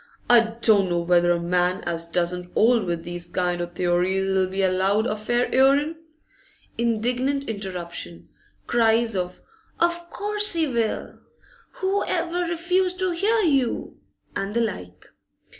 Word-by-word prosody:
'I 230 -1 +4
don't 200 -4 +5
know 175 0 0
whether 175 0 +3
a 170 - +1
man 180 +2 0
as 165 0 -1
doesn't 180 +1 -1
'old 230 -1 +3
with 170 -2 -3
these 175 0 -5
kind 175 0 -1
o' 175 - -2
theories 180 +2 0
'll 190 -1 +2
be 190 +1 -2
allowed 190 +3 +2
a 210 - -1
fair 240 +3 0
'earin 280 +4 +3 0.4
' - - -31
Indignant 245 +4 0
interruption. 175 - -6 0.4
Cries 230 -1 +2
of 180 -1 -4 0.4
'Of 345 0 0
course 415 0 +1
he 330 -1 +1
will!' 235 -4 -2 0.5
'Who 385 +1 -1
ever 345 0 -2
refused 360 +2 0
to 370 0 0
hear 425 +6 +1
you?' 275 - 0 0.4
and 195 +2 -3
the 235 - +2
like. 90 - -5
215 Hz, 145 wpm, -23 LUFS, 180-280 Hz, 0.5 s, don't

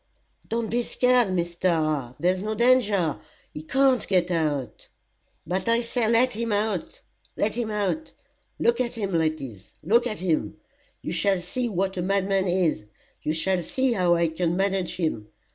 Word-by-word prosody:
"Don't 230 -1 -2
be 240 +1 +1
scared, 250 -1 +2
Mr. 170 -7 -1
there's 185 +2 +1
no 215 +2 -2
danger 215 - +3 0.3
he 150 - -6
can't 265 - +2
get 180 -2 +2
out." 145 -8 -2 0.6
"But 185 +7 -2
I 230 +1 +3
say 235 -1 0
let 240 +3 +3
him 230 0 -2
out 205 -3 -2 0.3
let 210 - +1
him 235 -1 -2
out. 210 +9 -2 0.5
Look 235 +1 +2
at 240 -1 -2
him, 200 -4 -3
ladies 155 - -2
look 235 +8 +3
at 215 -3 -4
him. 160 - -1 0.5
You - - -3
shall 195 -2 +2
see 235 +8 -3
what 190 -1 -1
a - - 0
madman 195 +1 +1
is 175 - 0 0.4
you 155 - -1
shall 180 +3 0
see 260 +9 0
how 180 -4 +3
I 170 -1 +2
can 170 +1 -1
manage 195 -2 0
him. 155 - -2
190 Hz, 160 wpm, -25 LUFS, 170-230 Hz, 0.6 s, danger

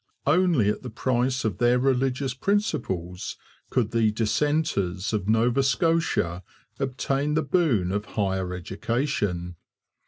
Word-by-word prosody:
Only 175 - +3
at - - -5
the 125 - -6
price 130 +2 0
of 100 -5 -2
their 120 +1 +4
religious 130 0 +1
principles 95 - -2 0.3
could 120 -4 0
the 115 -2 +3
'dissenters' 110 - 0
of 105 -1 -1
Nova 115 +4 +3
Scotia 135 - +1 0.4
obtain 135 +2 -1
the 160 - +2
boon 135 - +1
of 105 +2 -2
higher 95 -4 -1
education. 90 - -2
120 Hz, 120 wpm, -25 LUFS, 100-135 Hz, 0.4 s, their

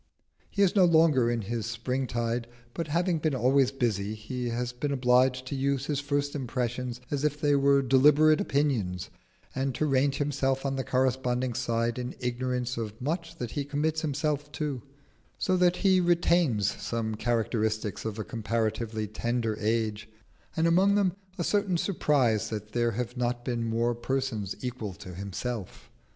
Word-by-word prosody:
He 200 - +2
is 195 - +2
no 190 -3 +6
longer 160 -8 +4
in 120 -2 -1
his 115 +2 -3
spring 125 +3 -2
tide, 120 0 -2 0.3
but 165 - -3
having 170 +2 +1
been 155 -2 0
always 130 +1 +3
busy 110 -6 -1
he 120 +3 -4
has 120 +1 -2
been 140 +4 -2
obliged 130 0 +3
to 140 - -4
use 135 0 0
his 145 -1 -1
first 145 0 -1
impressions 125 -2 -3
as 145 -1 -1
if 150 -1 0
they 145 -2 +3
were 140 0 +4
deliberate 150 +4 +5
opinions, 115 -12 0 0.4
and 135 -1 -1
to 155 - 0
range 135 -1 +2
himself 135 -2 0
on 135 0 0
the 135 - -2
corresponding 130 -1 0
side 115 -1 -1
in 125 0 -5
ignorance 125 0 -2
of 110 -1 -5
much 165 +5 -3
that 120 -5 -4
he 145 - -2
commits 150 +3 -1
himself 150 -1 -1
to; 145 -4 -3 0.6
so 185 - +1
that 180 -1 +4
he 190 -2 +3
retains 170 - +2
some 115 -2 -2
characteristics 110 -2 -1
of 110 -1 -4
a 110 - -3
comparatively 110 0 -2
tender 115 +1 -1
age, 110 -1 -1 0.5
and 160 - +3
among 185 +4 +4
them 190 -3 +2 0.2
a 175 - -1
certain 200 -1 +1
surprise 140 - +1
that 105 -1 -5
there 120 +1 +1
have 125 +3 -4
not 120 0 -1
been 120 -2 -1
more 115 +1 +1
persons 120 -5 -2
equal 120 -6 -4
to 90 - -10
himself. 100 +3 -6
125 Hz, 165 wpm, -28 LUFS, 115-145 Hz, 0.6 s, no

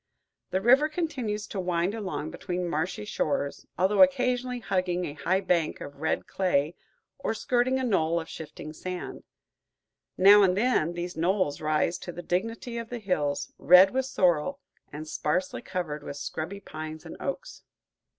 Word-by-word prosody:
The 190 - 0
river 260 +8 +5
continues 265 -11 -2
to 200 - -5
wind 180 +1 0
along 185 -8 -4
between 180 0 -3
marshy 160 - -2
shores, 140 +4 -2
although 190 - +3
occasionally 250 -2 +3
hugging 185 -5 -1
a 145 - -5
high 185 +5 0
bank 175 -4 +1
of 140 0 -9
red 160 - 0
clay 165 -5 0 0.5
or 225 - -2
skirting 245 +3 +1
a 260 - -1
knoll 170 -8 +2
of 160 - -7
shifting 155 -1 -8
sand; 180 +3 -6 1.0
now 200 +2 +8
and 190 -1 +3
then 210 -8 +2
these 175 +1 -5
knolls 170 -2 0
rise 155 +2 +1
to 175 - -6
the 175 +1 -8
dignity 225 +7 -2
of 230 -1 -7
hills, 180 -12 -2
red 180 +2 +8
with 265 0 0
sorrel 180 - +1 0.3
and 155 +2 -7
sparsely 180 +4 -1
covered 175 -5 -4
with 140 0 -7
scrubby 170 +7 -5
pines 155 -1 -7
and - - -8
oaks. - - -5
185 Hz, 155 wpm, -27 LUFS, 160-225 Hz, 1.0 s, now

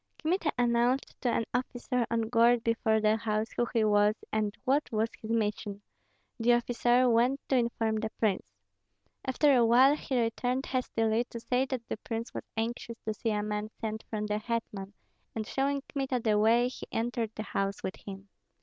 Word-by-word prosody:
Kmita 330 -1 0
announced 240 +2 +1
to 250 - +1
an 230 - +1
officer 245 -1 -1
on 230 0 +1
guard 230 +1 +3
before 225 -1 +2
the 215 0 +3
house 220 -1 -1
who 240 - 0
he 230 -2 +2
was 210 0 +4 0.2
and 215 -1 0
what 285 +3 +1
was 220 +1 0
his 220 - -7
mission; 210 -2 -1 0.6
the 240 +1 +4
officer 240 +1 +3
went 245 +3 +3
to 270 - +3
inform 230 -2 0
the 220 0 -2
prince. 205 -4 +1 0.8
After 280 +2 +3
a 240 - +5
while 255 +5 +6
he 265 -4 -2
returned 245 +3 0
hastily, 230 -3 0
to 235 - -8
say 250 +3 0
that 255 -3 -4
the - - -3
prince 225 +1 -5
was - - -5
anxious 230 +1 -3
to 215 - -1
see 225 +2 -2
a 210 -1 0
man 210 0 -3
sent 220 -1 -4
from 210 -1 -2
the 210 0 -1
hetman; 215 -3 -4 0.4
and 220 -1 -2
showing 275 +3 -1
Kmita 270 -3 -1
the 215 -2 +2
way, 230 +3 +4
he 250 - -8
entered 230 0 -1
the 215 - -4
house 195 -1 -2
with 190 - -4
him. 195 0 -9
230 Hz, 185 wpm, -30 LUFS, 215-245 Hz, 0.8 s, while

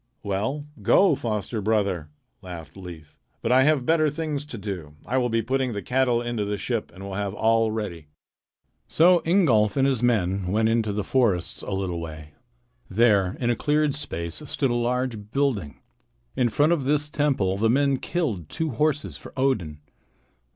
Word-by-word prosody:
"Well, 110 +9 -2 0.2
go, 195 -4 +5
foster 110 -3 -3
brother," 100 -7 0 0.3
laughed 85 -4 -9
Leif. 85 -5 -10 0.3
"But 115 - 0
I 130 +1 +6
have 150 -4 +2
better 155 0 +3
things 150 -1 -3
to 125 - -6
do. 95 -8 -6
I 130 - -1
will 125 -1 +1
be 115 0 0
putting 130 +1 0
the 100 - -4
cattle 125 -2 +1
into 120 -3 -2
the 105 0 -2
ship 115 +1 -3
and 95 - -11
will 100 -1 -6
have 100 0 -3
all 115 +1 +3
ready." 100 -8 -5 0.8
So 175 +2 +5
Ingolf 135 - +3
and 135 - +4
his 130 -4 +1
men 100 -6 +1
went 110 +4 +2
into 115 -2 +1
the 105 0 -2
forests 100 -9 0
a - - -7
little 95 -3 -2
way. 80 -2 -8 0.6
There 100 -3 +3
in 120 -1 +1
a - - +1
cleared 150 +3 +1
space 85 - -4
stood 135 -4 0
a - - +1
large 120 -3 -1
building. 110 - -1 0.6
In 125 -2 +2
front 150 +8 +3
of 145 -6 -1
this 145 +1 +2
temple 135 -11 0
the 110 +2 +2
men 140 +2 +3
killed 115 - -2
two 160 -2 -2
horses 150 +4 0
for - - -12
Odin. 95 - 0
115 Hz, 175 wpm, -25 LUFS, 95-135 Hz, 0.8 s, I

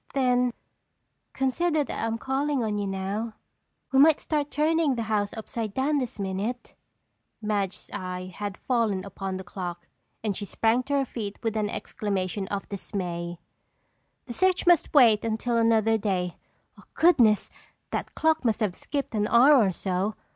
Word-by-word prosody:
"Then 250 -2 +3 0.8
consider 305 +4 +1
that - - -4
I'm 225 0 -1
calling 270 +1 -1
on 210 -2 -1
you 200 - -2
now. 200 +4 -3 0.6
We 265 - +4
might 305 +1 +6
start 295 -2 -1
turning 310 -1 +2
the 230 - -2
house 210 -2 0
upside 220 -1 -5
down 285 +3 +1
this 250 -3 -4
minute!" 200 +5 -3 0.7
Madge's 205 -3 -2
eye 185 0 -5
had 205 -1 -4
fallen 220 -7 0
upon 195 -1 -5
the 190 - -7
clock 175 -1 -6 0.4
and 210 -3 -1
she 205 - -5
sprang 225 +4 +1
to 285 - -3
her 275 -1 +2
feet 210 -5 -5
with 225 -1 -1
an 210 -1 0
exclamation 195 -2 -3
of 200 0 -4
dismay. 175 -4 -4 0.9
"The 240 - -6
search 375 +5 +2
must 350 -3 +4
wait 235 -7 +6
until 230 +2 -1
another 225 -1 +3
day. 185 -4 -1 0.6
Goodness! 240 - +4 0.4
That - - -4
clock 320 -1 +2
must 225 -1 +1
have 205 -4 +1
skipped 280 -4 -4
an 210 -1 +1
hour 245 +7 +6
or 215 -8 +4
so! 190 +3 -2
220 Hz, 155 wpm, -26 LUFS, 195-265 Hz, 0.9 s, might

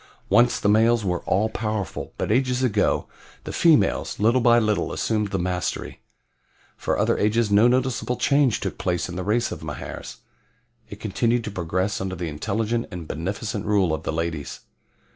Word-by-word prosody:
"Once 120 +1 +4
the 105 - 0
males 110 +1 +4
were 90 -2 -1
all 100 +4 +2
powerful, 105 -5 -4
but - - -2
ages 125 +1 +1
ago 105 -5 +1 0.4
the - - -6
females, 165 -4 +2
little 115 +5 +3
by 120 0 +5
little, 105 -5 +1
assumed 105 -2 0
the 95 - -2
mastery. 90 -1 -3 0.7
For - - -1
other - - +1
ages 110 +1 +1
no 105 +4 +6
noticeable 125 0 0
change 140 -4 +2
took - - -4
place 90 -1 -1
in 90 - -7
the 95 - -3
race 115 +5 0
of - - -6
Mahars. - - -7 0.7
It 105 - -9
continued 115 +3 0
to 110 - -5
progress 95 +2 -2
under 95 -1 -3
the 85 -2 -4
intelligent 110 +10 -2
and 90 -5 -7
beneficent 100 +6 -3
rule 100 -6 +2
of 80 - -2
the - - -3
ladies. 80 -2 -4
105 Hz, 170 wpm, -24 LUFS, 90-120 Hz, 0.7 s, no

